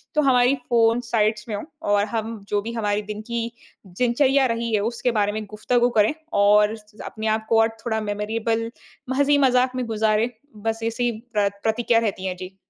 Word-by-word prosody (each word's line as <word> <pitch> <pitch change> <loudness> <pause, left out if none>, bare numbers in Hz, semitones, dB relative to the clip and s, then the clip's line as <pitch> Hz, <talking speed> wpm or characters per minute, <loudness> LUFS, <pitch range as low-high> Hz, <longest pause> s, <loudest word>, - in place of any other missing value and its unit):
तो 300 - +4
हमारी 250 +1 +4
phone 230 0 +4
sides 215 -1 +1
में 210 - -2
हो 205 - -5 0.3
और 205 0 +3
हम 225 0 -3
जो 205 -1 +1
भी 230 +2 -6
हमारी 210 -2 0
दिन 210 0 -4
की 235 -1 0 0.5
दिनचर्या 260 +7 +2
रही 230 -1 -3
है 210 - +3
उसके 240 +1 -1
बारे 205 -2 +1
में 215 +1 -4
गुफ़्तगू 240 +3 +2
करें 210 +7 +4 0.3
और 210 +1 +4
स 210 0 -21
अपने 220 0 -5
आप 220 0 0
को 225 -1 +4
और 225 - +4 0.2
थोड़ा 220 -2 0
मेमोरेबल 225 +2 -2 0.4
म - - 0
हँसी-मज़ाक 265 -3 +3
में 255 -1 -2
गुजारें। 220 +1 +1 0.4
बस 225 0 0
ऐसी 230 +2 -1
ही 240 - +2 0.2
प्र 205 -1 +2
प्रतिक्रिया 230 +1 +2
रहती 200 -4 -2
है। 185 -1 -2
जी। 185 +1 -9
225 Hz, 195 wpm, -23 LUFS, 210-240 Hz, 0.5 s, तो